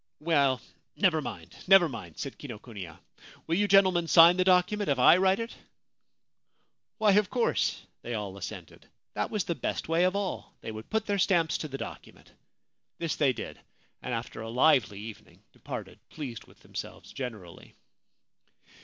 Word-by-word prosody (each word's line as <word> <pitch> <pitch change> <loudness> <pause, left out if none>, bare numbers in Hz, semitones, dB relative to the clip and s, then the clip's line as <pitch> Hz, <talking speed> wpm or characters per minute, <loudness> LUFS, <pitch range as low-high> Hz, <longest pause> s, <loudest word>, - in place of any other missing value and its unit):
' - - -59
Well, 140 -5 +2 0.4
never 175 -6 +2
mind, 85 - -8
never 195 -2 +7
mind,' 95 - -9
said 140 - -6
Kinokuniya. 105 - -9 0.3
' - - -20
Will 165 - -2
you 205 +4 +2
gentlemen 185 -3 +4
sign 170 +2 +8
the 185 - +2
document 185 +2 +2
if 140 - +2
I 125 +7 +7
write 190 +1 +3
it? 230 0 -5 0.7
' - - -50
Why, 215 -2 +4
of 205 -1 +3
course, 245 -2 0 0.2
they 120 - -4
all 100 -3 -5
assented. 100 - -9 0.3
That - - -2
was 210 -4 -1
the 170 - -2
best - - -3
way 165 +2 +2
of 185 +1 +1
all. 200 -2 -4
They - - -6
would 110 0 -9
put 220 -1 0
their 200 -1 -1
stamps 170 -4 +2
to 155 - -4
the 135 -2 -6
docu - - -8
ment. - - -21 0.7
This 165 -2 -2
they 140 -3 +3
did, 115 -3 -7 0.4
and 125 - -5
after 115 -1 -4
a 110 - -6
lively 120 -5 +3
evening 110 +1 -11
departed - - -8
pleased 130 -7 -7
with - - -21
themselves - - -8
generally. 110 -10 -8
160 Hz, 175 wpm, -28 LUFS, 115-185 Hz, 0.7 s, sign